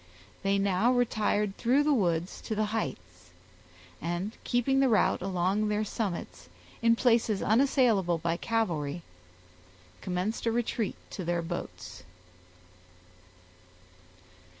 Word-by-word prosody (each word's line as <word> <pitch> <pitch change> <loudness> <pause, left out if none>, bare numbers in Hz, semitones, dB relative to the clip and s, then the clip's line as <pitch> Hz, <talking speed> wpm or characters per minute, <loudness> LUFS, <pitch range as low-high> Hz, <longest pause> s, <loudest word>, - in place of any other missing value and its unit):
They 195 0 +1
now 200 +4 +2
retired 210 -4 +1
through 260 +5 +3
the 300 0 +3
woods 175 -7 0
to 220 - -2
the 215 0 +1
heights, 90 - -5 0.7
and, 175 +5 -2
keeping 255 +3 +1
the 270 -1 +4
route 215 -4 +2
along 190 +3 0
their 210 0 0
summits, 195 - -4 0.3
in 230 0 +4
places 230 -4 +2
unassailable 220 - +3
by 165 +1 -1
cavalry, 175 -9 -1 1.0
commenced 185 +6 -2
a - - +3
retreat 230 -2 -1 0.2
to 190 - -5
their 175 0 -1
boats. 170 +1 -6
205 Hz, 110 wpm, -29 LUFS, 175-230 Hz, 1.0 s, the